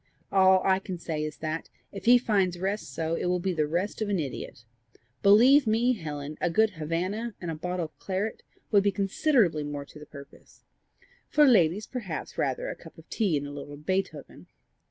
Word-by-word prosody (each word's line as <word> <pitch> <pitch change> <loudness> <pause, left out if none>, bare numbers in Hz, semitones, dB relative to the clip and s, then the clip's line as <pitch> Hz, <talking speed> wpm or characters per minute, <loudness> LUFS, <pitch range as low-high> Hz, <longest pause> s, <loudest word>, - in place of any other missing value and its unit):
All 190 -1 +5
I 190 0 +3
can 190 -2 -6
say 160 -3 -4
is 155 0 -5
that, 155 +1 -3 0.2
if 195 -1 -9
he 245 +1 +8
find 200 -7 +1
rest 190 -3 -3
so, 160 +4 -2
it 165 - -1
will 180 0 +2
be 185 +1 -1
the 155 -3 0
rest 180 +8 -2
of 215 - -1
an 200 - +1
idiot! 130 -5 -6 0.6
Believe 245 +7 +6
me, 235 +4 +3
Helen, 150 - -6
a 175 - +2
good 220 +5 +3
Havannah 185 +7 -3
and 175 -2 -4
a - - -4
bottle 180 +2 -3
of 155 - -14
claret 195 +3 -3 0.3
would 205 -2 +5
be 200 0 +2
considerably 195 - +2
more 145 -1 -5
to 150 - -14
the 150 - -12
purpose; 140 0 -15 0.7
for 300 0 +5
ladies, 205 - +4
perhaps 200 -11 -6
rather - - -1
a - - -4
cup - - -15
of - - -15
tea 195 -9 +1
and 145 - -4
a 145 - -7
little 145 0 -8
Beethoven!" 185 +6 -4
185 Hz, 195 wpm, -27 LUFS, 155-210 Hz, 0.7 s, he